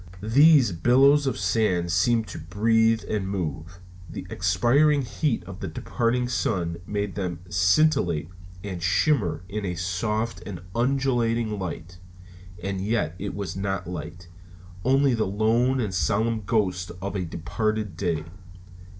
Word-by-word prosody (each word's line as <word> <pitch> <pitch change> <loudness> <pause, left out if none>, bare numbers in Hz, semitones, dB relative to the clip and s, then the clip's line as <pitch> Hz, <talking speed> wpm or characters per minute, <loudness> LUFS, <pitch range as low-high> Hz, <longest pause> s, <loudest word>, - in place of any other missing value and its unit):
These 140 - +6
billows 135 - +4
of 130 - -1
sand 95 -3 +1
seemed 110 +6 +2
to - - -7
breathe 115 +6 +2
and 100 -3 -2
move. 90 -2 -4 0.3
The 90 +2 -7
expiring 120 - +3
heat 120 - -1
of 95 +1 -10
the 95 - -4
departed 115 +9 -1
sun 85 -8 -1
made 105 -1 -2
them 90 -4 -4
scintillate 90 - +2 0.3
and 95 -4 -5
shimmer 95 - +1
in 105 +2 -4
a 90 -2 -2
soft 105 +6 -2
and 90 -4 -7
undulating 120 -4 0
light. 90 -1 -6 0.6
And 95 0 -3
yet 100 -6 0
it 100 0 -4
was 100 -2 -4
not 95 -1 -2
light; 85 +1 -7 0.6
only 135 +1 +3
the 110 -3 0
lone 115 +6 +2
and 105 -6 -2
solemn 110 +3 0
ghost 95 -5 0
of 100 +2 -4
a 95 - -1
departed 105 +4 -2
day. 85 -3 -1
100 Hz, 135 wpm, -25 LUFS, 90-115 Hz, 0.6 s, These